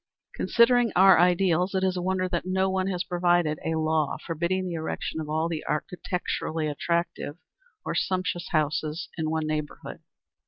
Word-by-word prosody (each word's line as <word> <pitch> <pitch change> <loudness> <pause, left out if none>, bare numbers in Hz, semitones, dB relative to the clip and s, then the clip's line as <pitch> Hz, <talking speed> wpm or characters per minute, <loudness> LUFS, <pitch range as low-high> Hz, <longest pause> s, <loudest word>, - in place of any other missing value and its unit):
Considering 240 -1 +3
our 190 -2 +7
ideals, 180 +1 +3
it 190 - +1
is 185 -1 +1
a 180 - -2
wonder 185 0 0
that 175 -2 -2
no 190 +1 0
one 190 0 0
has 180 -2 -1
provided 175 -4 +1
a 160 - -1
law 155 -2 0
forbidding 170 +3 -1
the 180 - -4
erection 160 0 -3
of 150 - -6
all 160 +2 0
the 165 -2 -4
architecturally 165 -1 -2
attractive, 170 0 -2 0.5
or - - -2
sumptuous 185 -2 -1
houses 155 0 -1
in 160 -2 -2
one 160 0 -1
neighborhood. 155 -1 -4
175 Hz, 160 wpm, -26 LUFS, 160-185 Hz, 0.5 s, our